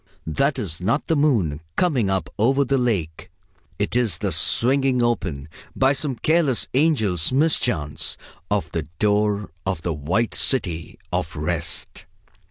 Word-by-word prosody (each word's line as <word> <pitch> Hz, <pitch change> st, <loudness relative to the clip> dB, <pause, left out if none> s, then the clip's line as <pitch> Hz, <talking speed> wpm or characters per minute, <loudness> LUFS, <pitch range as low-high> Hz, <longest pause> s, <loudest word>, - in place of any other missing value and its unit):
That 135 Hz, -, 0 dB
is 90 Hz, -8 st, -3 dB
not 115 Hz, +11 st, 0 dB
the 165 Hz, -, +1 dB
moon 115 Hz, -, +2 dB, 0.2 s
coming 130 Hz, -, +1 dB
up 95 Hz, -1 st, 0 dB
over 135 Hz, +6 st, +3 dB
the 135 Hz, +1 st, +1 dB
lake! 95 Hz, -11 st, -2 dB, 0.5 s
It -, -, -2 dB
is 115 Hz, -9 st, +2 dB
the -, -, -2 dB
swinging 130 Hz, 0 st, +2 dB
open, 80 Hz, -12 st, -1 dB, 0.3 s
by 135 Hz, +1 st, +3 dB
some 140 Hz, -1 st, -1 dB
careless 150 Hz, -1 st, +2 dB
angel's 115 Hz, -, +2 dB
mischance, 125 Hz, -, 0 dB, 0.3 s
of 100 Hz, -5 st, -1 dB
the 80 Hz, -3 st, -3 dB
door 105 Hz, -1 st, +1 dB
of 95 Hz, -4 st, -3 dB
the 85 Hz, -, -1 dB
White 90 Hz, +11 st, -1 dB
City 85 Hz, -, 0 dB, 0.2 s
of -, -, -2 dB
Rest!... -, -, -3 dB
115 Hz, 140 wpm, -22 LUFS, 85-135 Hz, 0.5 s, over